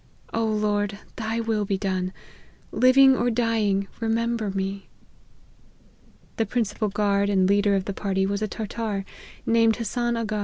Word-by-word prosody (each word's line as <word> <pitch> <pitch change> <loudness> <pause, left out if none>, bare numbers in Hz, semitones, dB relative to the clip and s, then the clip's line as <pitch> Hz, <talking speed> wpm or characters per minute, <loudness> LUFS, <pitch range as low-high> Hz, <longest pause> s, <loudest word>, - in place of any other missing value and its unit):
O 230 - 0
Lord, 210 -2 0 0.2
thy 225 +1 -2
will 225 -2 0
be 195 -1 -1
done! 185 -2 -2 0.6
Living 265 +1 +6
or 245 -1 +1
dying, 220 -4 +1
remember 230 -1 0
me 195 0 -3 0.7
!" - - -32
The 225 - +1
principal 220 -1 -1
guard 200 0 +1
and 190 -2 +3
leader 200 0 +3
of 190 -1 -1
the 200 - -3
party 190 0 -1
was 200 +1 -2
a 215 - 0
Tartar, 210 -1 -4 0.4
named 230 -1 +4
Hassan 240 +1 -1
Aga. 215 -2 -2
210 Hz, 150 wpm, -25 LUFS, 200-230 Hz, 0.7 s, Living